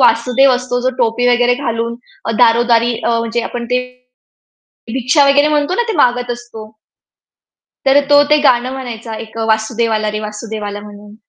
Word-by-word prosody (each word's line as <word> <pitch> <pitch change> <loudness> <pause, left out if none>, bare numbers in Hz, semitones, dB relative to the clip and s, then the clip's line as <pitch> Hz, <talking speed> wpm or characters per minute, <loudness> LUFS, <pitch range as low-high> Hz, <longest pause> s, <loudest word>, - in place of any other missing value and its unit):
वासुदेव 250 +3 +4
असतो 250 0 -2
जो 255 +1 0
टोपी 240 +1 +1
वगैरे 245 0 +3
घालून 235 -3 -3 0.3
अ, - - -2
दारोदारी 235 0 +3
अ, 230 -1 +1
म्हणजे 230 +1 -2
आपण 240 -1 -5
ते 250 0 +2 1.1
भिक्षा 265 +3 +2
वगैरे 285 +2 +4
म्हणतो 300 +2 0
ना - - +1
ते 445 - -1
मागत 245 -2 +2
असतो. 240 -3 -9 1.2
तर 270 +1 +5
तो 290 0 +6
ते 300 - +6
गाणं 250 -1 +3
म्हणायचा 235 -4 -7
एक 220 - -15
अ, - - -1
वासुदेव 220 +1 0
आला 215 -1 -1
रे 215 - -3
वासुदेव 215 0 -6
आला 205 0 -5
म्हणून. 205 0 -13
240 Hz, 170 wpm, -15 LUFS, 225-255 Hz, 1.2 s, तो